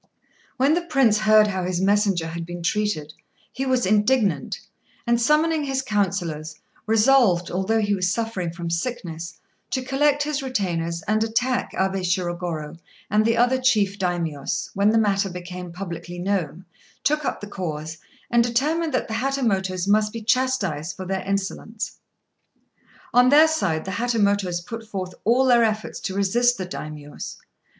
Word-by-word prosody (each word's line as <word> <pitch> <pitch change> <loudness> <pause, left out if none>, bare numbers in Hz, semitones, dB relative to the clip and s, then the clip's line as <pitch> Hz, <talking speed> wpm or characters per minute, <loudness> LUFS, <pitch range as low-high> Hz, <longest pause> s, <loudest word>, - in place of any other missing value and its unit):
] - - -34
When 270 +4 +3
the 345 - +2
Prince 270 -10 +3
heard 215 0 +6
how 190 -3 -2
his 180 -1 -1
messenger 200 -3 +2
had 170 +1 -5
been 175 0 -7
treated, 170 -5 -1 0.4
he 270 +2 -3
was 255 -1 +2
indignant, 210 - +2 0.5
and 235 -1 +2
summoning 305 +4 +2
his 270 -1 -1
councillors 175 -9 -2 0.3
resolved, 220 -6 +4
although 190 +5 +1
he 205 -1 +1
was 185 -2 +1
suffering 210 -5 -2
from 170 0 -5
sickness, 170 -4 -4 0.3
to 260 - -2
collect 290 +2 +2
his 300 -1 -2
retainers 170 -10 -2
and 215 +1 +1
attack 245 +3 0
Abé 190 0 0
Shirogorô; 175 -3 -2 0.3
and 210 +1 +4
the 230 +1 +2
other 245 +2 +3
chief 205 -6 +2
Daimios, 170 -6 -2
when 200 +1 +3
the 225 - +3
matter 200 -3 +2
became 180 0 -7
publicly 175 -1 -7
known, 180 -2 -2 0.4
took 300 +1 +1
up - - -2
the - - -7
cause, 160 -5 -5 0.3
and 235 0 +5
determined 295 +6 0
that - - -1
the 220 - -5
Hatamotos 215 -8 0
must 210 +1 +3
be 230 0 -7
chastised 210 - 0
for 190 - -6
their 190 0 -2
insolence. 210 +3 -3 1.1
On 250 +1 +6
their 300 +3 +7
side, 180 - -1
the 190 - -4
Hatamotos 200 -5 +1
put 230 +2 -6
forth 185 -3 -4
all 245 +4 +4
their 240 -2 +5
efforts 215 -1 -1
to 190 - -4
resist 240 +5 +2
the 185 - -3
Daimios. 150 -4 -7
205 Hz, 160 wpm, -23 LUFS, 180-245 Hz, 1.1 s, their